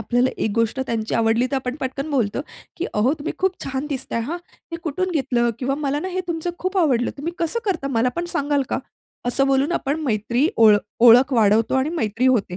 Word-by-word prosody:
आपल्याला 245 +3 +1
एक 220 - 0
गोष्ट 230 +2 0
त्यांची 230 -4 -2
आवडली 230 +2 +2
तर - - -1
आपण 255 -1 -3
पटकन 275 +3 -3
बोलतो, 245 -3 0 0.4
की 350 - -3
"अहो 225 +7 +3
तुम्ही 290 - -4
खूप 380 0 0
छान 270 +1 -3
दिसताय 265 -4 -2
हां. 345 - -3 0.3
हे 335 - -2
कुठून 370 +4 -2
घेतलं? 255 -6 +1
किंवा 270 +2 -1
मला 285 +1 0
ना 370 - -3
हे 370 0 -2
तुमचं 335 +1 -2
खूप 370 +2 -3
आवडलं. 255 -8 +2
तुम्ही 330 +5 -3
कसं 335 +7 -1
करता 355 -9 -1
मला 250 - +3
पण 345 - -1
सांगाल 285 0 +1
का?" - - 0 0.5
असं 270 +3 +2
बोलून 275 +4 +2
आपण 295 -2 -1
मैत्री 245 +2 +1
ओळख 215 -2 +7 0.3
ओळख 250 +4 +7
वाढवतो 225 0 +3
आणि 265 +2 +2
मैत्री 225 +4 0
होते. 205 -8 +1
265 Hz, 205 wpm, -22 LUFS, 235-305 Hz, 0.5 s, ओळख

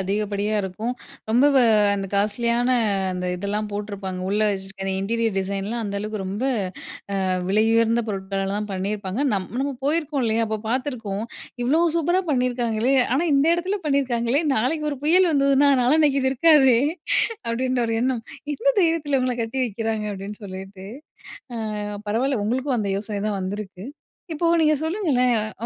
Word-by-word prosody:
அதிகப்படியா 205 +2 -1
இருக்கும். 210 +6 -3 0.4
ரொம்ப 250 +5 +5
வ - - +6 0.4
அந்த 195 -1 -3
காஸ்ட்லியான 235 +4 +1 0.4
அந்த 180 0 -4
இதெல்லாம் 205 +3 -2
போட்ருப்பாங்க. 200 -3 -5
உள்ள 210 +1 +1
வச்சிருக்க 195 0 -5
அந்த 195 - -1
இன்டீரியர் 225 0 -1
டிசைன்லாம், 200 +4 -2
அந்த 200 0 -3
அளவுக்கு 210 0 -4
ரொம்ப 200 +7 -3 0.8
அ - - 0 0.2
விலையுயர்ந்த 225 +3 +3
பொருட்களால 195 0 -2
தான் 210 0 -3
பண்ணியிருப்பாங்க. 195 +3 -3
நம் 185 -2 -3
நம்ம 280 0 -1
போயிருக்கோம் 300 -2 0
இல்லயா? 225 0 +1
அப்போ 220 0 -2
பாத்துருக்கோம். 230 -5 -2 0.4
இவ்ளோ 305 +7 +3 0.2
சூப்பரா 345 +4 +2
பண்ணிருக்காங்களே? 245 -1 +1 0.2
ஆனா 300 - +2
இந்த 275 +3 +3
எடத்துல 375 +4 -2
பண்ணிருக்காங்களே? 265 0 +1
நாளைக்கு 300 +7 0
ஒரு 275 - -6
புயல் 355 +2 +5
வந்துதுனா, 280 0 +4
நாளான்னைக்கி 285 +1 +3
இது 265 - +2
இருக்காதே? 265 -4 +5 0.7
அப்டின்ற 255 +2 0
ஒரு 225 - -1
எண்ணம். 250 -3 0 0.3
எந்த - - -1
தைரியத்துல 325 -5 +1
இவுங்கலாம் 250 -2 0
கட்டி 225 +4 -4
வைக்கிறாங்க? 225 -1 -2
அப்டின்னு 205 +3 -8
சொல்லிட்டு. 190 0 -8 0.9
அ - - -3 0.3
பரவால்ல 235 +1 0
உங்களுக்கும் 255 +2 0
அந்த 200 -1 -1
யோசனை 205 -1 -4
தான் 200 -2 -2
வந்திருக்கு. 190 0 -5 0.5
இப்போ 335 +2 -1
நீங்க 310 -1 +4
சொல்லுங்களேன், 315 - +1 0.3
அ - - -2
230 Hz, 145 wpm, -23 LUFS, 200-270 Hz, 0.9 s, வ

